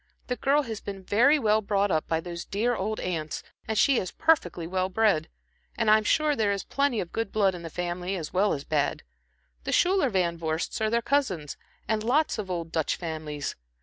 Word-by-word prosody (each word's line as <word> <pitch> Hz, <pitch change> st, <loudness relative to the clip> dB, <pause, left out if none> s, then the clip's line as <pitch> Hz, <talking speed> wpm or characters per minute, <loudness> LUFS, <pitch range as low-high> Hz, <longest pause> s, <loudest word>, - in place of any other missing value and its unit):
The 250 Hz, -, 0 dB
girl 285 Hz, +3 st, +2 dB
has 225 Hz, -5 st, -6 dB
been 195 Hz, -2 st, -7 dB
very 245 Hz, +11 st, +4 dB
well 215 Hz, -5 st, +2 dB
brought 200 Hz, -1 st, +1 dB
up 155 Hz, -2 st, 0 dB
by 160 Hz, -, +1 dB
those 170 Hz, 0 st, -6 dB
dear 235 Hz, +5 st, 0 dB
old 215 Hz, +2 st, -2 dB
aunts, 160 Hz, -4 st, -3 dB, 0.2 s
and 220 Hz, -, -1 dB
she 270 Hz, +3 st, +4 dB
is 185 Hz, -, -3 dB
perfectly 180 Hz, -, +1 dB
well 185 Hz, +2 st, -1 dB
bred. 195 Hz, -6 st, +2 dB, 0.5 s
And 225 Hz, -2 st, +3 dB
I'm 215 Hz, 0 st, +5 dB
sure 300 Hz, +6 st, +2 dB
there 215 Hz, -4 st, +1 dB
is 200 Hz, -1 st, -2 dB
plenty 280 Hz, -5 st, 0 dB
of 175 Hz, -, -4 dB
good 225 Hz, -3 st, -2 dB
blood 200 Hz, -3 st, +2 dB
in 175 Hz, -, -7 dB
the 165 Hz, -, -6 dB
family 175 Hz, +2 st, -3 dB
as 160 Hz, -5 st, -5 dB
well 200 Hz, +3 st, +3 dB
as 140 Hz, -, -4 dB
bad. 145 Hz, -2 st, -1 dB, 0.6 s
The -, -, -3 dB
Schuyler 370 Hz, -6 st, +3 dB
Van 175 Hz, -5 st, 0 dB
Vorsts 160 Hz, +5 st, -2 dB
are 220 Hz, -, +2 dB
their 235 Hz, +1 st, +1 dB
cousins, 195 Hz, -, 0 dB, 0.3 s
and 220 Hz, -1 st, 0 dB
lots 270 Hz, +2 st, +1 dB
of 200 Hz, -3 st, -4 dB
old 170 Hz, -2 st, -3 dB
Dutch 160 Hz, -3 st, 0 dB
families. 155 Hz, -4 st, -5 dB
200 Hz, 210 wpm, -27 LUFS, 170-230 Hz, 0.6 s, I'm